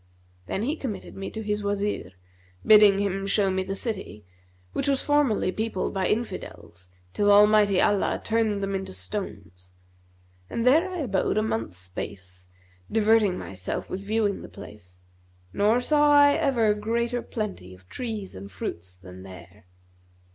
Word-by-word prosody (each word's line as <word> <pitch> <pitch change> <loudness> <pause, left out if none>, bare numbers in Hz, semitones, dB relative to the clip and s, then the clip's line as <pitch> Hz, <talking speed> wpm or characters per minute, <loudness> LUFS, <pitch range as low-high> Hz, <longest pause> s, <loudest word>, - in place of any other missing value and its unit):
Then 200 - -2
he 285 +6 0
committed 255 -10 -6
me 195 - -5
to 220 - -6
his 210 0 -2
Wazir, 200 - -2 0.5
bidding 210 -2 +7
him 195 -1 -1
show 195 -1 +2
me 190 0 0
the 195 +1 -4
city, 195 - -5 0.5
which - - -2
was 275 -1 +1
formerly 290 -10 +2
peopled 220 -2 -3
by 190 -2 0
Infidels, 90 - -5 0.2
till 205 0 +3
Almighty 205 -1 +5
Allah 205 -1 +2
turned 220 -3 0
them 195 0 -2
into 190 - -4
stones; 95 - -7 0.8
and 230 - -2
there 320 +9 +4
I 365 -3 -4
abode 205 -6 0
a 215 - +2
month's 115 - -3
space, 90 0 -8 0.4
diverting 220 -3 +3
myself 95 -1 -6
with 190 +1 -4
viewing 210 -1 0
the - - -10
place, 90 -3 -13 0.5
nor 215 +4 +3
saw 295 +3 +3
I 285 0 +7
ever 230 -8 +2
greater 235 +3 -1
plenty 190 - -6
of 90 0 -22
trees 220 - -5
and 100 +1 -10
fruits 90 +1 -6
than 90 0 -12
there. 95 +1 -13
200 Hz, 150 wpm, -25 LUFS, -, 0.8 s, bidding